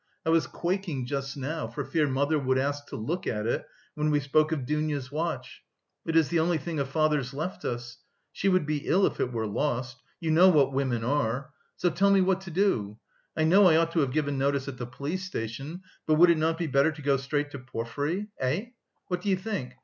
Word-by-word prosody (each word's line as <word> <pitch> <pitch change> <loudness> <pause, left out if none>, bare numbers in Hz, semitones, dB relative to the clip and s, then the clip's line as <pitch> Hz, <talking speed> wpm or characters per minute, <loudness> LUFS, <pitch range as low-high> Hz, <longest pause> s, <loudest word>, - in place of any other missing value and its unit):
I 160 - +2
was 165 -1 +3
quaking 175 -7 -2
just 140 +1 -3
now, 150 +4 -3
for 145 - -5
fear 155 -3 +1
mother 140 +3 +1
would 130 -1 +1
ask 145 +2 -1
to - - -7
look 170 - -3
at 105 -1 -1
it, 115 - -1 0.3
when 150 0 0
we 150 -1 +3
spoke 155 +3 +2
of 145 -5 -1
Dounia's 150 -2 -2
watch. 150 -5 -3 0.5
It 165 - -1
is 160 -3 +4
the 170 - +2
only 165 +1 +2
thing 160 0 -4
of 135 -1 -1
father's 150 -3 +1
left 160 +6 -4
us. 120 0 -4 0.3
She 195 - 0
would 185 -4 +3
be 150 -1 -2
ill 190 +2 +4
if - - -2
it 125 - 0
were 115 -2 -2
lost. 125 +3 -2 0.2
You 165 -3 -1
know 175 +4 +7
what 140 -6 +4
women 130 -4 0
are. 135 +2 -1 0.2
So 175 - +1
tell 195 +5 +3
me 195 -1 +5
what 190 0 +2
to 190 - -9
do. 155 - 0 0.4
I 155 - +2
know 185 +5 +6
I 160 - +5
ought 165 +1 +3
to 165 - +1
have 140 -4 +1
given 145 -1 0
notice 140 0 0
at 135 -2 -6
the 120 - -4
police 140 +9 -4
station, 140 - -5 0.2
but 155 - +4
would 170 +2 +7
it 170 - +2
not 160 +1 +1
be 170 - -1
better 140 +1 +3
to 150 0 -10
go 140 0 +3
straight 145 +2 -2
to 140 - -7
Porfiry? 130 - -3
Eh? 150 - -1 0.4
What 180 -1 -3
do 200 - -2
you 190 - +4
think? 185 - -4
150 Hz, 230 wpm, -28 LUFS, 130-165 Hz, 0.5 s, know